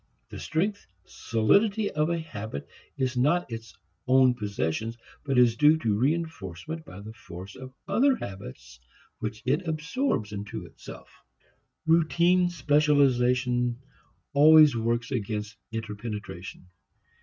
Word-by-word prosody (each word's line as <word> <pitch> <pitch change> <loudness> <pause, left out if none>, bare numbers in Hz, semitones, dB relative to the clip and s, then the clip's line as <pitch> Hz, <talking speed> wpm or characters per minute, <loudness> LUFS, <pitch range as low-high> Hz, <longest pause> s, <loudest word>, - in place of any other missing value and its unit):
The - - -8
strength, 200 +6 -2 0.2
solidity 200 - +1
of 150 +2 0
a 170 - 0
habit 110 - -7 0.3
is 130 -1 -1
not 145 +4 +1
its 115 0 -8 0.3
own 130 0 +5
possession 105 -1 -3 0.3
but 135 -2 -1
is 120 -2 +5
due 150 +4 +5
to 115 -9 0
reinforcement 145 - -3
by 95 -7 -11
the 110 +2 -9
force 90 -2 -10
of 130 0 -10 0.2
other 270 +2 +3
habits 65 - -9 0.4
which 110 -1 -5
it 150 +8 0
absorbs 160 - -1
into 100 -1 -6
itself. - - -12 0.8
Routine 170 +2 +3
specialization 130 -6 +2 0.6
always 150 -1 +7
works 115 +1 -1
against 105 -3 -3 0.2
interpenetration. 105 -5 -6
125 Hz, 115 wpm, -27 LUFS, 110-160 Hz, 0.8 s, always